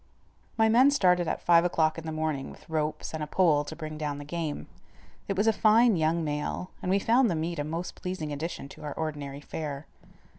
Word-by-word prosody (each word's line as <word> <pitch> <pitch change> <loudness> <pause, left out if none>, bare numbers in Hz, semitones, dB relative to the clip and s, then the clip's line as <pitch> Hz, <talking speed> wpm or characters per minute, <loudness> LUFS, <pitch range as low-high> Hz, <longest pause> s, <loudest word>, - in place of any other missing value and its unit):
My 220 0 +5
men 245 +5 +6
started 180 - +3
at - - -2
five 170 -1 +5
o'clock 160 -2 +1
in 165 - -8
the - - -3
morning 155 -3 -2
with - - -14
ropes 155 -1 -2
and 160 - -4
a 150 - -3
pole 155 -3 +3
to 155 - -8
bring 155 -1 -7
down 145 -2 -2
the 145 - -8
game. 160 -1 -4 0.6
It 195 - -2
was 205 - +2
a 225 - +4
fine 220 +1 +5
young 165 +1 +1
male, 150 +4 -3
and 180 - -3
we 195 - +4
found 235 +4 +3
the 170 - 0
meat 165 +1 -2
a - - 0
most 165 +4 -4
pleasing 170 -5 -5
addition 150 -1 -5
to - - -12
our 145 -1 -4
ordinary 145 -3 -4
fare. 145 -1 -5
160 Hz, 220 wpm, -28 LUFS, 150-180 Hz, 0.6 s, men